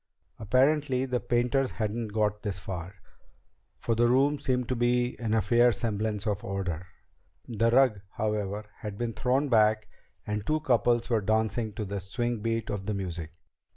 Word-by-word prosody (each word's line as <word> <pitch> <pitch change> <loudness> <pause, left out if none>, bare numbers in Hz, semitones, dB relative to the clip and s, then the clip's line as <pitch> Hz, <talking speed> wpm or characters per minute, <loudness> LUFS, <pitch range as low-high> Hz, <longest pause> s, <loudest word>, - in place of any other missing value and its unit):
Apparently 130 +4 +2
the 125 -2 -1
painters 125 +3 +1
hadn't 110 +1 -2
got 105 0 0
this 100 -3 -3
far, 95 0 -6 0.8
for 115 - -1
the 120 +1 +3
room 140 +4 +3
seemed 125 -3 0
to 130 - +1
be 120 +1 +1
in 110 -1 0
a 110 - +2
fair 120 +4 +5
semblance 110 -2 -2
of 105 -3 -1
order. 95 -3 -3 0.6
The 115 -1 +1
rug, 120 -4 +4
however, 105 -1 -2
had 105 -2 -6
been 120 0 -2
thrown 130 +5 +1
back 110 -3 +3 0.4
and 105 -1 -2
two 155 +6 0
couples 120 -4 +2
were 115 -2 +3
dancing 110 +1 0
to 110 -1 -4
the 100 +1 -4
swing 120 +5 -2
beat 115 +1 -2
of 100 -2 -4
the 105 - -1
music. 85 -4 -5
110 Hz, 165 wpm, -28 LUFS, 105-120 Hz, 0.8 s, fair